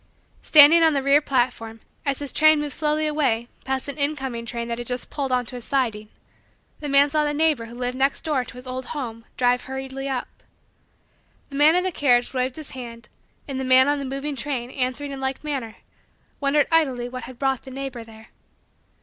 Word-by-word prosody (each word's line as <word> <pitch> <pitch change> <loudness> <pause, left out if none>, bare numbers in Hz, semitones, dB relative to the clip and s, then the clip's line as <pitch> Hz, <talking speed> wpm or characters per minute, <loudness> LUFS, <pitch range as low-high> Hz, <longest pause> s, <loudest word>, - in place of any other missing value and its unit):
Standing 310 +2 +7
on 320 -1 +5
the 275 -1 0
rear 280 +2 +5
platform, 240 -5 -1 0.3
as 275 -1 +1
his 285 -2 -3
train 310 0 +5
moved 295 -2 -3
slowly 305 +1 +1
away 260 -6 0 0.2
past 265 0 0
an 285 +1 -6
incoming 265 -5 -2
train 235 0 -4
that 235 0 -4
had 240 - -6
just 250 0 -5
pulled 275 -3 -3
onto 250 -1 -1
a 245 - -6
siding, 225 -5 -2 0.7
the 295 - -5
man 280 +1 +5
saw 305 0 +2
the 295 0 -1
neighbor 305 -6 +2
who 235 +1 -11
lived 250 0 -3
next 275 +1 +1
door 295 -5 0
to 245 - -12
his 250 +1 -8
old 255 0 -5
home 230 -4 -6
drive 245 0 +2
hurriedly 265 +1 -5
up. 260 -2 -2 1.2
The - - -7
man 300 +4 +5
in 360 - +2
the 375 - -1
carriage 245 -6 +2
waved 255 0 -1
his 310 -3 -9
hand 235 -3 -9 0.4
and 270 -2 -4
the - - -2
man 260 +1 +6
on 290 0 +1
the 280 - -4
moving 275 +2 -4
train, 255 -2 -4
answering 260 +2 -2
in 270 -1 -7
like 265 +1 -3
manner, 265 -7 -4 0.6
wondered 285 +1 +2
idly 265 -7 +2
what 255 0 -7
had 255 - -11
brought 270 -1 0
the - - -11
neighbor 265 -2 -6
there. 220 0 -15
265 Hz, 205 wpm, -23 LUFS, 245-290 Hz, 1.2 s, Standing